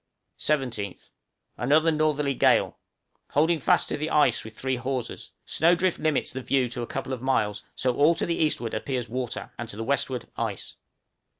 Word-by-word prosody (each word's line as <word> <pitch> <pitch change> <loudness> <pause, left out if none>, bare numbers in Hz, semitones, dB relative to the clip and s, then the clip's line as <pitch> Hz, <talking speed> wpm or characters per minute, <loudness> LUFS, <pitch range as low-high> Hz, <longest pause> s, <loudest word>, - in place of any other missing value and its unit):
17th. 125 -10 -2 0.5
Another 155 +6 +3
northerly 150 -2 +1
gale; - - +3 0.5
holding 160 +3 +2
fast - - +3
to - - -2
the 155 +2 -2
ice 150 -2 +3
with 110 0 -11
three 130 -1 -1
hawsers; 130 0 -4 0.2
snow 170 +3 +3
drift 185 0 0
limits 155 -2 0
the 130 - -4
view 130 0 +1
to 120 +1 -5
a 120 - -4
couple 135 0 -4
of 125 - -5
miles, 105 -6 0
so 125 -1 0
all 150 +5 +5
to - - -1
the 170 - 0
eastward 135 -7 0
appears 125 -3 -2
water, 125 +1 -4
and 120 -1 -5
to 105 - -9
the 115 - -3
westward 130 -1 -1
ice. - - -4
135 Hz, 180 wpm, -26 LUFS, 120-150 Hz, 0.5 s, all